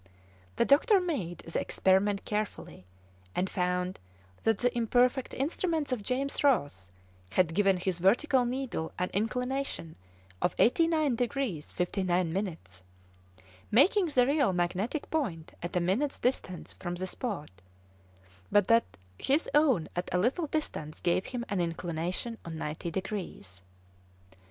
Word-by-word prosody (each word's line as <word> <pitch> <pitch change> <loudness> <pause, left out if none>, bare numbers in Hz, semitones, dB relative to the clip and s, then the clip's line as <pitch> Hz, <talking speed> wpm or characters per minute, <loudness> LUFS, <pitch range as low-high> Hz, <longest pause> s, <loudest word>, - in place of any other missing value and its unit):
The - - +2
doctor 380 - +5
made 265 - -3
the 165 - -2
experiment 195 +1 +2
carefully, 210 - -4 0.5
and 185 - +1
found 180 0 -1 0.5
that 225 -2 +3
the 245 +2 0
imperfect 245 +3 +2
instruments 315 +1 -1
of 250 -4 -1
James 265 +7 -2
Ross 145 - +1 0.4
had 165 - +2
given 195 0 +3
his 180 -1 -2
vertical 245 - +3
needle 245 -9 -3
an 180 0 -1
inclination 250 -4 -2 0.5
of - - +1
89 310 0 +3
degrees 245 - -2
59 180 -2 0
minutes, 165 - -4 0.9
making 355 - +5
the 255 -5 +3
real 280 -6 +2
magnetic 185 - -1
point 200 - -2
at 175 - -5
a - - +4
minute's 200 +12 0
distance 185 -8 -2
from 175 -1 -3
the 185 +1 -3
spot, 185 - -4 1.0
but 205 -2 +5
that 230 0 +3 0.2
his 285 +5 +1
own 275 - +4
at 175 +1 -3
a - - +2
little 260 - +1
distance 220 - -3
gave 175 +2 +1
him 245 -2 -4
an 200 -3 -1
inclination 175 +6 -3
of 165 -1 -6
90 155 +2 -4
degrees. 175 - -5
205 Hz, 130 wpm, -30 LUFS, 175-265 Hz, 1.0 s, doctor